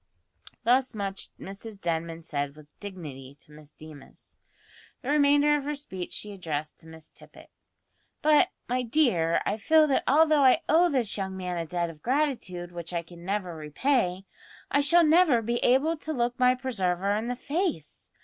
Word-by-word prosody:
Thus 255 +1 +2
much 195 -2 -4
Mrs 200 +2 -9
Denman 165 -1 -3
said 145 -2 -3
with 155 -1 -14
dignity 145 -9 -8
to 150 - -17
Miss 150 0 -14
Deemas. 155 -3 -13 0.6
The 265 - -1
remainder 290 0 +4
of 290 - -2
her 295 +1 -2
speech 190 -11 -7
she 210 - -6
addressed 155 -6 -5
to 160 - -17
Miss 160 -1 -12
Tippet. - - -16 0.7
"But, 310 +4 +5 0.2
my 250 +1 0
dear, 225 - +2
I - - -1
feel 310 +8 +4
that 280 -3 +1
although 305 +1 +4
I 265 +6 +5
owe 340 +3 +4
this 245 -9 -1
young 190 -1 -4
man 180 -1 -4
a 165 -1 -3
debt 170 0 -2
of 155 -2 -18
gratitude 240 - -1
which 175 0 -7
I 170 -1 -2
can 170 0 -14
never 190 -2 -3
repay, 180 - -1 0.5
I 285 - +3
shall 340 +5 +5
never 315 -5 +5
be 235 +2 -1
able 270 +8 +2
to 310 +1 -5
look 245 -1 -1
my 250 0 +4
preserver 200 -6 -1
in 220 +2 -2
the 245 - -2
face. 285 - -3
210 Hz, 175 wpm, -27 LUFS, 170-280 Hz, 0.7 s, But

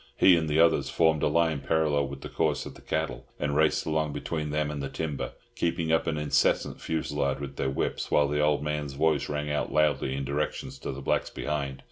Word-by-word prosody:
He 95 - +7
and 80 -2 0
the 75 +1 +2
others 85 0 +4
formed 80 -2 +3
a - - +3
line 80 -1 +2
parallel 75 0 +1
with 70 0 -8
the - - -6
course - - 0
of - - -8
the - - -15
cattle, 60 +1 -3
and 75 -1 -1
raced 80 +1 +3
along 80 -1 0
between 75 +1 -3
them 75 0 0
and 75 -1 -4
the 70 - -3
timber, 75 -3 -4 0.2
keeping 85 -1 0
up 80 - +2
an 80 -2 0
incessant 75 -1 +1
fusillade 70 -4 -1
with 70 -1 -7
their 65 - 0
whips, 65 - -2
while 75 -1 +4
the 75 +1 0
old 75 -1 +2
man's 75 -2 -2
voice 75 0 +1
rang 75 0 -2
out 75 -3 -1
loudly 75 -3 +2
in 70 0 -3
directions 70 +2 -3
to - - -4
the 70 - -7
blacks - - 0
behind. 70 -3 -3
75 Hz, 220 wpm, -28 LUFS, 70-80 Hz, 0.2 s, He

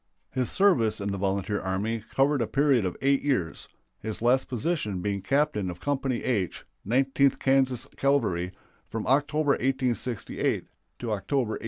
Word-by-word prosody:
His 130 -2 -1
service 120 - +3
in 100 0 -2
the 100 - -2
volunteer 100 +1 -1
army 105 +4 -2
covered 135 0 +3
a 115 - 0
period 135 -6 +3
of 90 - -3
eight 140 0 +3
years, 125 - -1 0.3
his 110 -1 -5
last 125 +3 +2
position 125 - -1
being 100 +1 -2
captain 135 -5 +1
of 90 0 -7
Company 135 -2 -1
H, 105 -8 -1 0.2
Nineteenth 135 +4 +2
Kansas 130 -2 +2
Cavalry, 105 -11 +1 0.4
from 110 -1 -4
October, 145 +2 +2
1868, 130 -4 -1 0.3
to 120 -2 -4
October, 120 +4 0
1869. - - -3
125 Hz, 150 wpm, -27 LUFS, 105-135 Hz, 0.4 s, service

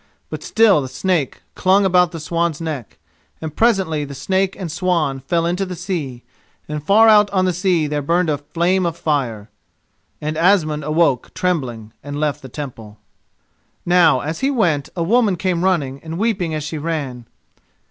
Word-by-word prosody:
But - - -5
still 220 -8 +4
the 130 - -4
snake 165 -1 -1
clung 195 +2 +3
about 180 -2 +3
the 165 - -6
swan's 165 0 -1
neck, 155 - -5 0.4
and 155 -2 -6
presently 175 -11 +1
snake 190 +6 0
and 180 -5 -5
swan 165 -6 0
fell 165 +5 -1
into 175 +3 0
the 185 -1 -5
sea, 145 -10 -4 0.4
and 150 -1 -5
far 215 +7 +5
out 210 -2 +6
on 185 -2 +1
the 185 - +1
sea 180 -2 +1
there 150 0 -2
burned 170 +5 +1
a 150 -2 0
flame 170 +5 0
of 170 0 -4
fire. 125 -11 -2 0.7
And 155 +1 -3
Asmund 160 -5 +2
awoke 155 -4 +1
trembling 130 - -2
and 145 0 -5
left 150 -2 -1
the 130 - -10
Temple. 115 -6 -8 0.9
Now 170 -7 +4
as 155 +2 -4
he 270 - +1
went, 175 - +1
a 170 - -1
woman 215 +1 +3
came 180 -1 -1
running, 145 -8 0
and 160 0 -6
weeping 185 -6 -1
as 155 - -3
she 150 +1 -5
ran. 140 -7 -4
165 Hz, 170 wpm, -19 LUFS, 145-185 Hz, 0.9 s, out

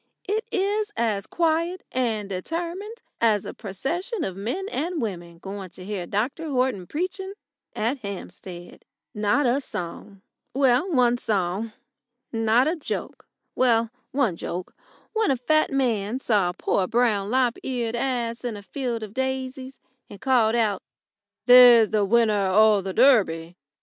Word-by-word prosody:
It 430 +3 0
is 415 +2 0
as 210 -4 0
quiet 335 +2 0
and 225 -5 -1
determined 340 - -5 0.2
as 215 -4 +2
a - - -6
procession 330 - -4
of 190 - -3
men 240 - -3
and 330 +3 -2
women 175 -7 -5
going 195 +1 -7
to 180 +1 -12
hear 195 -4 -4
Dr 260 - -2
Horton 250 -9 0
preaching 375 +4 -4 0.4
at 235 +6 -1
Hampstead. 185 -4 -9 0.3
Not 210 +7 +1
a 250 +3 +2
song 190 -1 -7 0.3
well, 270 +6 +3
one 245 -4 +3
song. 205 0 -1 0.6
Not 225 +3 +3
a 325 - +1
joke 315 - -6 0.3
well, 230 -3 +2 0.2
one 255 -10 +1
joke, 175 +2 -5 0.4
when 440 -1 +1
a 270 - +2
fat 310 +6 +2
man 235 -5 0
saw 210 -8 +2
a 175 - -6
poor 185 - 0
brown 220 -4 +1
lop 250 -1 +1
eared 240 -3 -2
ass 235 -2 -2
in 235 -4 -3
a 205 - -10
field 235 +1 -3
of 210 -1 -8
daisies, 265 0 -3 0.3
and 200 - -11
called 240 -3 +3
out: 220 -4 +1 0.6
"There's 245 -3 +8
the 210 -2 +2
winner 215 -2 +3
o' 215 0 +5
the 190 0 -4
Durby!" 180 -10 +3
235 Hz, 145 wpm, -24 LUFS, 200-270 Hz, 0.6 s, There's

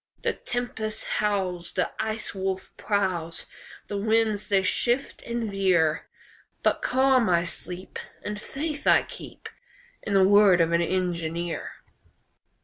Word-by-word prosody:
The - - +1
tempest 225 -3 -4 0.2
howls, 185 -4 -1
The - - 0
Ice 220 0 -3
Wolf 190 -1 -3
prowls, 185 -5 -1 0.4
The 205 - -3
winds 220 -1 +1
they 195 -2 +3
shift 240 +7 0
and 235 -1 -3
veer, 180 -5 +2 0.6
But - - +2
calm 260 -3 +3
I 170 -1 +3
sleep, 180 +2 -5 0.2
And 210 0 -5
faith 295 +4 -4
I - - +6
keep - - -10 0.5
In 200 - -2
the 190 -1 +6
word 200 -3 +6
of 165 0 +3
an 170 0 +3
engineer. 170 -2 -2
195 Hz, 130 wpm, -26 LUFS, 175-220 Hz, 0.6 s, I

